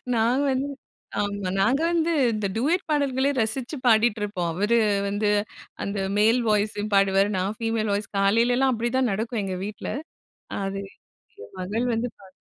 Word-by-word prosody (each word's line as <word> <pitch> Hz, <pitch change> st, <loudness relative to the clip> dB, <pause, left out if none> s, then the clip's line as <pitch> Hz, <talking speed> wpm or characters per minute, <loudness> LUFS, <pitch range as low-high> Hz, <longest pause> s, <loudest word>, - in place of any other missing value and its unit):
நாங்க 235 Hz, +5 st, +2 dB
வந்து 270 Hz, +2 st, -1 dB, 0.5 s
ஆம் 205 Hz, 0 st, -1 dB, 0.2 s
நாங்க 260 Hz, +9 st, +3 dB
வந்து 335 Hz, 0 st, +1 dB, 0.2 s
இந்த 210 Hz, -2 st, -1 dB
டூயட் 330 Hz, +10 st, +1 dB
பாடல்களே 280 Hz, -2 st, +1 dB
ரசிச்சு 240 Hz, +6 st, -1 dB
பாடிட்ருப்போம். 210 Hz, -6 st, +2 dB
அவரு 210 Hz, +6 st, +2 dB, 0.3 s
வந்து 205 Hz, +1 st, 0 dB, 0.5 s
அந்த 200 Hz, 0 st, -3 dB, 0.2 s
மேல் 225 Hz, +4 st, +4 dB
வாய்ஸ்சு 210 Hz, 0 st, +1 dB
பாடுவார். 195 Hz, 0 st, +4 dB
நான் 195 Hz, +4 st, -2 dB
ஃபீமேல் 225 Hz, -2 st, 0 dB
வாய்ஸ் 205 Hz, +1 st, -3 dB
காலையிலலாம் 240 Hz, +6 st, +3 dB
அப்டிதான் 240 Hz, +1 st, 0 dB
நடக்கும் 225 Hz, +1 st, -2 dB
எங்க 185 Hz, -1 st, -3 dB
வீட்ல. 210 Hz, +1 st, -6 dB, 0.7 s
அது 195 Hz, 0 st, -3 dB, 0.6 s
ஏ -, -, -9 dB
மகள் 215 Hz, +7 st, -1 dB
வந்து 235 Hz, +2 st, -1 dB
பாத்து 190 Hz, -2 st, -16 dB
220 Hz, 140 wpm, -25 LUFS, 200-245 Hz, 0.7 s, மேல்